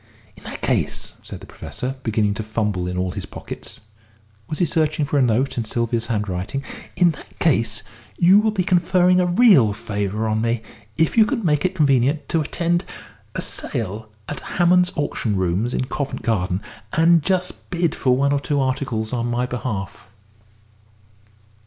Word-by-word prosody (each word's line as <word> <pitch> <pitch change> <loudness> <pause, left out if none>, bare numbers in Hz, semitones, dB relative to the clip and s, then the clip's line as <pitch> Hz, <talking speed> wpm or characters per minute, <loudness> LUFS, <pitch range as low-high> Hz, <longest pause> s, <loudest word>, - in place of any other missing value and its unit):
"In - - -16
that - - -7
case," - - -1
said - - -9
the - - -10
Professor, 130 +2 -6
beginning 110 -4 +1
to 100 - -4
fumble 105 -4 -1
in 90 0 -3
all 90 0 -1
his - - -6
pockets - - -7 0.7
was 155 - -3
he 175 - +3
searching 155 -2 +1
for 145 0 +1
a - - +4
note 125 +2 +1
in - - 0
Sylvia's 115 +1 -1
handwriting? 105 +4 -2 0.3
"in 175 -2 +4
that 155 - -13
case, 115 -8 +1 0.3
you 185 +4 +6
will 220 +1 +2
be 205 -4 0
conferring 180 0 +3
a 180 - +2
real 175 - +5
favour 105 +1 -2
on 110 0 0
me 115 0 0 0.3
if 160 +8 +3
you 220 - +8
can 235 -7 -2
make 150 -1 +2
it 185 +1 0
convenient 140 -2 +2
to 165 - +2
attend 170 +3 0 0.5
a - - -2
sale 110 0 -4 0.2
at 145 - -4
Hammond's 180 0 +3
Auction 140 -7 -1
Rooms 95 +5 0
in 130 - -1
Covent 140 +2 -4
Garden, 95 -3 0 0.3
and 165 0 +5
just 180 +2 -2
bid 170 -3 0
for 125 -1 +2
one 140 +1 +2
or 140 - +2
two 145 0 -1
articles 130 -4 -1
on 120 -1 -1
my 120 +1 0
behalf." 110 -7 -5
130 Hz, 170 wpm, -22 LUFS, 110-170 Hz, 0.7 s, you